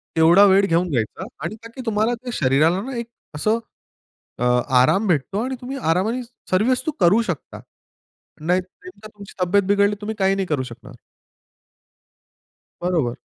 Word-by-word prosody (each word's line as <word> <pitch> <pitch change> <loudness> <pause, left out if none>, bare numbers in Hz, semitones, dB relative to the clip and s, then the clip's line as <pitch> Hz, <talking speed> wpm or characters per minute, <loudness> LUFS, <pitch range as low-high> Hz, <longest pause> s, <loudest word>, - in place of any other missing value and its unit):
तेवढा 165 +5 +6
वेळ 195 +1 +5
घेऊन 175 -1 +1
घ्यायचा 120 -8 -2 0.2
आणि 170 +6 -4
का 230 - -9
की 260 - -6
तुम्हाला 220 +2 +1
ते 245 - -4
शरीराला 155 - +2
ना 255 +3 -6
एक 235 - -4 0.3
असं 215 +9 +1 0.8
अ, - - -1 0.4
आराम 190 +12 +3
भेटतो 175 +4 0
आणि 260 +1 -3
तुम्ही 265 +2 -5
आरामाने 215 +5 0 0.3
सर्व 200 +6 +2
वस्तू 255 +5 0
करू 195 +6 +5
शकता. 175 - -5 0.8
नाही, 180 +4 +2 0.3
नेमका 200 +4 -11
तुमची 205 -2 -13
तब्येत 190 +3 +3
बिघडली 200 +1 +2
तुम्ही 220 +1 -4
काही 195 0 +3
नाही 195 -1 -1
करू 145 -4 -1
शकणार. 125 +1 -11 1.9
बरोबर. 165 -9 0
195 Hz, 155 wpm, -21 LUFS, 165-215 Hz, 1.9 s, तेवढा